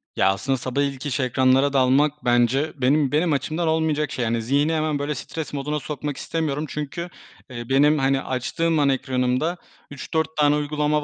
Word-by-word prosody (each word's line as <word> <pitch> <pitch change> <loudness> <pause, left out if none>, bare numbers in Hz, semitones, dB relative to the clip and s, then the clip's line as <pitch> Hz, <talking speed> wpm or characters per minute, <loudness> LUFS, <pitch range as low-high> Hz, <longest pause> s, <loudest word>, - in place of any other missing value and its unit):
Ya, 95 - +3
aslında 135 +8 0
sabah 130 +2 -2
ilk 140 -1 -3
iş 140 -1 -2
ekranlara 130 +2 +2
dalmak 140 +3 +2
bence 120 +5 +2
benim 140 +2 +2
benim 155 +2 +2
açımdan 155 +5 -1
olmayacak 160 -2 0
şey. 115 -2 -1
Zihni 140 +7 +1
hemen 155 -2 0
böyle 145 +1 -2
stres 160 +1 -6
moduna 145 +2 -2
sokmak 145 0 -5
istemiyorum. 155 -2 -2
Çünkü, 150 +4 -5 0.4
eee, 120 -2 -7
benim, 145 +3 +4
hani, 135 0 +1
açtığım 155 +6 -1
an 145 -1 +3
ekranımda 130 +5 0 0.3
3-4 160 +2 -3
tane 150 -1 +4
uygulama 150 0 0
145 Hz, 165 wpm, -23 LUFS, 130-150 Hz, 0.4 s, benim